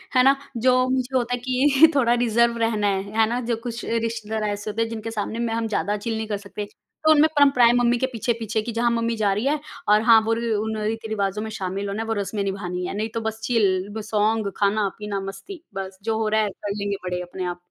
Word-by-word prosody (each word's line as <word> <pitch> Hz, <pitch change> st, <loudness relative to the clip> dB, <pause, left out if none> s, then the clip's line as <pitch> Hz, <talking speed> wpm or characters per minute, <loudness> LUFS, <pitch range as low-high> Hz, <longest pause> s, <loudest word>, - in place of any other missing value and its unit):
है 255 Hz, -, +6 dB
ना? 270 Hz, +1 st, +6 dB, 0.2 s
जो 255 Hz, +1 st, +3 dB
मुझे 260 Hz, 0 st, -1 dB
होता 245 Hz, 0 st, -1 dB
है 245 Hz, -, -1 dB
कि 275 Hz, +4 st, +5 dB
थोड़ा 240 Hz, -3 st, +4 dB
रिजर्व 235 Hz, 0 st, +2 dB
रहना 225 Hz, -2 st, +1 dB
है, 195 Hz, -1 st, 0 dB, 0.2 s
है 220 Hz, -, +5 dB
ना? 245 Hz, +1 st, -1 dB
जो 235 Hz, -1 st, -1 dB
कुछ 235 Hz, -1 st, -5 dB
रिश्तेदार 225 Hz, -1 st, -2 dB
ऐसे 205 Hz, +1 st, -4 dB
होते 220 Hz, +2 st, -2 dB
हैं 225 Hz, -, 0 dB
जिनके 225 Hz, 0 st, -5 dB
सामने 220 Hz, +1 st, -3 dB
में 230 Hz, -1 st, -1 dB
हम 230 Hz, 0 st, -1 dB
ज़्यादा 210 Hz, -1 st, -1 dB
चिल 225 Hz, +1 st, -3 dB
नहीं 220 Hz, -1 st, -3 dB
कर 205 Hz, -2 st, -2 dB
सकते, 205 Hz, +1 st, -7 dB, 0.4 s
तो 315 Hz, -, +6 dB
उनमें 310 Hz, +1 st, +6 dB
परंपराएँ 255 Hz, -5 st, +6 dB
मम्मी 245 Hz, 0 st, +3 dB
के 260 Hz, -, +1 dB
पीछे-पीछे 225 Hz, -2 st, -2 dB
की 235 Hz, +2 st, -5 dB
जहाँ 235 Hz, +1 st, +1 dB
मम्मी 230 Hz, 0 st, 0 dB
जा 205 Hz, -2 st, +2 dB
रही 210 Hz, +6 st, -2 dB
है 295 Hz, +1 st, +1 dB, 0.3 s
और 210 Hz, +1 st, +6 dB
हाँ, 225 Hz, -1 st, +7 dB
वो 225 Hz, +1 st, -1 dB, 0.3 s
उन 220 Hz, 0 st, -3 dB
रीति-रिवाजों 215 Hz, -2 st, -2 dB
में 220 Hz, -, -4 dB
शामिल 195 Hz, 0 st, -3 dB
होना 200 Hz, +3 st, -3 dB
है 225 Hz, -, -5 dB
वो 225 Hz, -, 0 dB
रस्में 200 Hz, 0 st, -3 dB
निभानी 180 Hz, -2 st, -3 dB
है, -, -, -4 dB
नहीं 220 Hz, +1 st, -2 dB
तो 230 Hz, -, -2 dB
बस 220 Hz, 0 st, -4 dB
चिल 205 Hz, -2 st, +1 dB
सॉन्ग 215 Hz, -1 st, 0 dB
खाना-पीना 205 Hz, 0 st, 0 dB
मस्ती 195 Hz, -, -8 dB
बस, 190 Hz, 0 st, -6 dB
जो 220 Hz, -1 st, 0 dB
हो 220 Hz, -, 0 dB
रहा 215 Hz, 0 st, +2 dB
है 210 Hz, -, 0 dB
कर 200 Hz, +1 st, -6 dB
लेंगे 200 Hz, 0 st, -2 dB
बड़े 180 Hz, 0 st, -2 dB
अपने 180 Hz, +1 st, -5 dB
आप। 175 Hz, 0 st, -3 dB
220 Hz, 235 wpm, -23 LUFS, 205-235 Hz, 0.4 s, हाँ